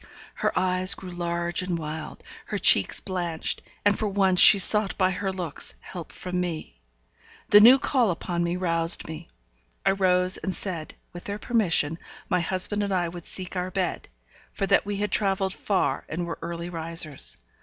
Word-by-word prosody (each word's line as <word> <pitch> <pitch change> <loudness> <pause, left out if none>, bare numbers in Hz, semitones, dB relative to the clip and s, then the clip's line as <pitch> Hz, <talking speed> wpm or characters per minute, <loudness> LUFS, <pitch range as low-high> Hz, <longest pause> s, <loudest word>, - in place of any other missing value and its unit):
Her - - -1
eyes 185 0 +2
grew 185 -2 -10
large 175 0 -2
and 180 -2 -3
wild, 155 0 -7 0.2
her - - -3
cheeks 100 - +5
blanched, 175 -4 -3 0.2
and 205 0 +2
for 215 - -1
once 190 -2 +1
she 205 - +9
sought 205 +1 +5
by 185 -1 +2
her 190 +1 -3
looks 180 -5 -4
help 175 -4 -10
from 180 0 -4
me. 160 - -6 0.7
The 205 - +8
new 240 +5 +8
call 255 -4 +1
upon 175 0 -3
me 170 +1 -2
roused 165 -2 0
me. 160 +1 -9 0.6
I - - +4
rose 185 -1 +2
and 190 - -4
said, 170 -6 -5 0.2
with 175 - -10
their 200 0 -4
permission 175 -9 +1 0.3
my - - +1
husband 185 +4 +1
and 200 -1 -2
I 175 -3 0
would 175 0 -9
seek 185 0 -4
our 180 0 -3
bed, 185 -2 -4 0.4
for 195 - -3
that 200 +1 +2
we 205 - -3
had 205 0 -3
travelled 195 -2 0
far 195 -1 -1
and 175 +2 -4
were 170 - -7
early 170 +1 -6
risers. 165 -3 -3
180 Hz, 175 wpm, -25 LUFS, 170-195 Hz, 0.7 s, she